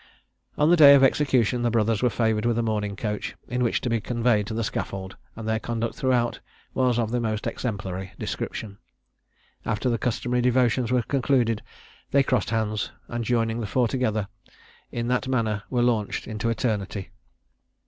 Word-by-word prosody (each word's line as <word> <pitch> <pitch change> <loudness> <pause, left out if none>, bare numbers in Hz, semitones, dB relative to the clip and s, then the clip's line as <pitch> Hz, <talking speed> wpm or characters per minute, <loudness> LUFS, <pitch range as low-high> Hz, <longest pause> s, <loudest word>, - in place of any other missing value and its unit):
On 150 +3 +4
the - - +7
day 145 -4 +9
of 135 - +5
execution 130 -3 +3
the 120 - +2
brothers 115 -2 +1
were 125 - +3
favoured 110 -1 0
with 120 -1 +1
a 120 - +1
mourning 105 -2 -1
coach, 105 -1 -3
in 125 0 -2
which 120 - +1
to - - -3
be 115 -1 +1
conveyed 115 -3 +1
to 110 - -4
the 115 - -1
scaffold; 95 -2 -4 0.2
and 110 -1 -7
their 110 0 +1
conduct 115 0 -2
throughout 125 -4 0 0.3
was 125 -2 +2
of 115 -2 0
the 120 - +1
most 110 -2 -2
exemplary 95 -5 -4
description. 100 -2 -5 0.8
After 115 +3 0
the 115 - 0
customary 125 +1 0
devotions 125 -1 +2
were 125 -1 +2
concluded, 125 -4 +1 0.5
they 140 0 +4
crossed 130 -2 0
hands, 110 -2 -1 0.2
and 120 0 -3
joining 115 -1 0
the 110 - -3
four 125 +3 +2
together, 110 -5 -1 0.6
in 120 0 -3
that 125 +1 0
manner 110 -5 0
were 120 -2 +1
launched 115 -4 0
into 110 +1 -2
eternity. 105 -4 -2
115 Hz, 175 wpm, -25 LUFS, 110-125 Hz, 0.8 s, day